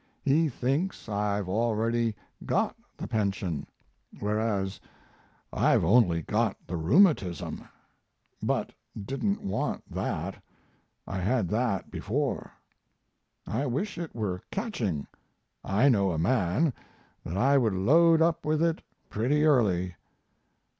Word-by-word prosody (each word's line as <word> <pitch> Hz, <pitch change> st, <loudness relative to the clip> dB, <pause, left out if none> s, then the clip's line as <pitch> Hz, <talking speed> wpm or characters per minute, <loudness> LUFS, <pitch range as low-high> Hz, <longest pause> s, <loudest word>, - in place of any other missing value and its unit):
He 155 Hz, +3 st, +3 dB
thinks 140 Hz, +9 st, -2 dB
I've 105 Hz, -2 st, -1 dB
already 115 Hz, +2 st, 0 dB, 0.3 s
got -, -, 0 dB, 0.2 s
the -, -, -5 dB
pension, 100 Hz, -7 st, -2 dB, 0.5 s
whereas 105 Hz, -2 st, -1 dB, 0.7 s
I've -, -, +3 dB
only 90 Hz, -5 st, +4 dB
got -, -, 0 dB
the 90 Hz, -, -4 dB
rheumatism; 95 Hz, -, +2 dB, 0.8 s
but -, -, -1 dB, 0.3 s
didn't 135 Hz, -, -2 dB
want 95 Hz, -, -2 dB
that -, -, -3 dB, 0.6 s
I 95 Hz, -, -4 dB
had 100 Hz, 0 st, +1 dB
that 110 Hz, -3 st, -1 dB
before. -, -, -2 dB, 0.9 s
I 135 Hz, +7 st, -1 dB
wish 170 Hz, -, -2 dB
it 170 Hz, -7 st, -6 dB
were 95 Hz, -5 st, -2 dB
catching. 115 Hz, -, -2 dB, 0.6 s
I 105 Hz, +8 st, +3 dB
know 100 Hz, -7 st, +4 dB
a -, -, -2 dB
man 100 Hz, -, +2 dB, 0.5 s
that 85 Hz, -, -4 dB
I 135 Hz, +6 st, +4 dB
would 110 Hz, -6 st, +1 dB
load 160 Hz, -, +5 dB
up 165 Hz, 0 st, +1 dB
with 155 Hz, +1 st, +1 dB
it 165 Hz, 0 st, +1 dB, 0.3 s
pretty 135 Hz, +8 st, +1 dB
early. 95 Hz, -, +3 dB
115 Hz, 115 wpm, -28 LUFS, 95-145 Hz, 0.9 s, load